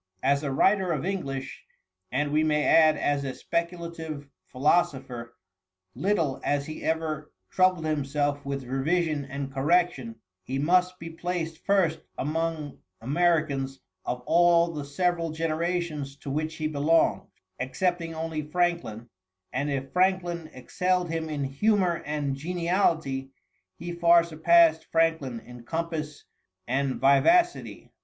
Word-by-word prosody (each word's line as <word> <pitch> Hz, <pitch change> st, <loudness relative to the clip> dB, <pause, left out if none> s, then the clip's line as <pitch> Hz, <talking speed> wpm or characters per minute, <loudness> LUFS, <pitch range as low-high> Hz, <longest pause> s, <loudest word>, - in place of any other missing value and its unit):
As 140 Hz, +2 st, +3 dB
a 145 Hz, -3 st, -2 dB
writer 190 Hz, +6 st, +3 dB
of 155 Hz, +1 st, -3 dB
English 140 Hz, -9 st, -4 dB, 0.5 s
and 145 Hz, +3 st, 0 dB
we 155 Hz, +1 st, +3 dB
may 150 Hz, -1 st, +1 dB
add 155 Hz, -2 st, +5 dB
as 145 Hz, -1 st, 0 dB
a 135 Hz, -2 st, -4 dB
speculative 170 Hz, -3 st, -4 dB, 0.2 s
philosopher 130 Hz, -5 st, 0 dB, 0.6 s
little 170 Hz, -9 st, 0 dB
as 145 Hz, -1 st, 0 dB
he 155 Hz, -, -7 dB
ever 155 Hz, -2 st, -2 dB, 0.2 s
troubled 185 Hz, -3 st, +3 dB
himself 145 Hz, -1 st, -1 dB
with 140 Hz, -1 st, -4 dB
revision 145 Hz, +3 st, 0 dB
and 135 Hz, 0 st, -6 dB
correction, 140 Hz, -4 st, +1 dB, 0.3 s
he 130 Hz, +8 st, -4 dB
must 180 Hz, +5 st, +2 dB
be 165 Hz, -1 st, -8 dB
placed 165 Hz, -1 st, -4 dB
first 185 Hz, -6 st, +2 dB, 0.2 s
among 155 Hz, 0 st, -2 dB, 0.2 s
Americans 140 Hz, -1 st, 0 dB, 0.2 s
of 125 Hz, 0 st, -3 dB
all 170 Hz, 0 st, +4 dB
the 145 Hz, -2 st, -5 dB
several 170 Hz, +2 st, 0 dB
generations 160 Hz, -2 st, -2 dB
to 140 Hz, -1 st, -7 dB
which 155 Hz, +2 st, -2 dB
he 155 Hz, -, -4 dB
belonged, 155 Hz, +2 st, +2 dB, 0.3 s
excepting 165 Hz, +5 st, -1 dB
only 160 Hz, -1 st, -3 dB
Franklin; 150 Hz, -8 st, -1 dB, 0.5 s
and 140 Hz, +3 st, -1 dB
if 135 Hz, -1 st, -3 dB
Franklin 180 Hz, -3 st, +1 dB
excelled 180 Hz, +6 st, -1 dB
him 160 Hz, -1 st, -3 dB
in 145 Hz, -2 st, -2 dB
humor 180 Hz, +5 st, +1 dB
and 145 Hz, -2 st, -1 dB
geniality, 165 Hz, -4 st, 0 dB, 0.5 s
he 175 Hz, -, -6 dB
far 170 Hz, 0 st, +5 dB
surpassed 165 Hz, 0 st, +4 dB
Franklin 160 Hz, -7 st, +1 dB
in 125 Hz, -1 st, -12 dB
compass 160 Hz, +1 st, -4 dB, 0.4 s
and 130 Hz, +1 st, 0 dB
vivacity. 240 Hz, -, +2 dB
155 Hz, 125 wpm, -27 LUFS, 140-170 Hz, 0.6 s, add